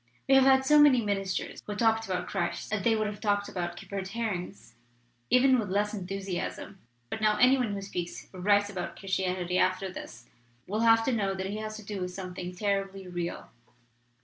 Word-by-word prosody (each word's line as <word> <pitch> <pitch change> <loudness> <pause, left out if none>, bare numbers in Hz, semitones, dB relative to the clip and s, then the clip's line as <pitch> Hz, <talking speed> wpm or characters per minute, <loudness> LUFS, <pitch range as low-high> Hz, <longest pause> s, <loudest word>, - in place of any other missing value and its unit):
We 270 - +4
have 270 -1 +7
had 265 0 +5
so 300 +2 +6
many 290 -4 +7
ministers 195 -2 -2
who 205 - -3
talked 225 0 +2
about 185 -1 -2
Christ 175 +1 -3
as 210 - 0
they 225 +2 +3
would 215 -1 0
have 210 0 -5
talked 205 -2 +1
about 175 -2 -4
kippered 195 -1 -6
herrings 195 - -4 0.6
even 255 0 +5
with 210 -4 -3
less 205 +2 0
enthusiasm. 195 0 -5 0.3
But 220 - -4
now 215 -1 +3
any 255 +3 +6
one 240 -6 -1
who 195 - -5
speaks 175 -3 -5
or 185 - -9
writes 205 +2 +3
about 185 -3 -5
Christianity 185 -2 -1
after 185 +1 +1
this 120 -7 -9 0.4
will 210 +3 -2
have 225 0 +5
to 260 - +1
know 200 -4 0
that 190 +1 -3
he 210 - -4
has 215 0 -5
to 215 - -9
do 200 -2 -5
with 180 - -2
something 180 -1 -6
terribly 195 -1 -2
real. 175 -1 -5
200 Hz, 200 wpm, -29 LUFS, 185-220 Hz, 0.6 s, have